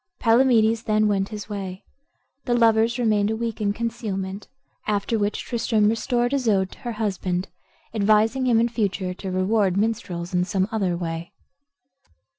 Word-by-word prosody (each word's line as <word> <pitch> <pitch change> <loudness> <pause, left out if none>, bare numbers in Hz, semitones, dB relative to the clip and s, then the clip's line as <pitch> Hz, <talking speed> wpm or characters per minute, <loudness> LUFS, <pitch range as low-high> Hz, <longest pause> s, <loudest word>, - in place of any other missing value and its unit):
Palamedes 230 -2 +3
then 215 0 +2
went 195 -1 0
his 210 -2 -7
way. 195 -3 -6 0.6
The 245 -2 +1
lovers 230 0 +3
remained 215 -4 +2
a 220 - 0
week 230 -1 -4
in 200 -1 +1
concealment, 205 -3 -4 0.4
after 210 +2 0
which 205 0 -1
Tristram 225 -3 +1
restored 240 +2 0
Isoude 210 -9 +1
to - - -14
her 240 -3 -5
husband, 190 -4 -2 0.4
advising 220 +4 +2
him 235 -2 +4
in 235 - +3
future 200 -5 -2
to 190 +1 -7
reward 190 +1 +1
minstrels 195 -5 -2
in 180 0 +2
some 190 +1 0
other 190 -6 0
way. 165 -1 -5
215 Hz, 150 wpm, -23 LUFS, 195-230 Hz, 0.6 s, him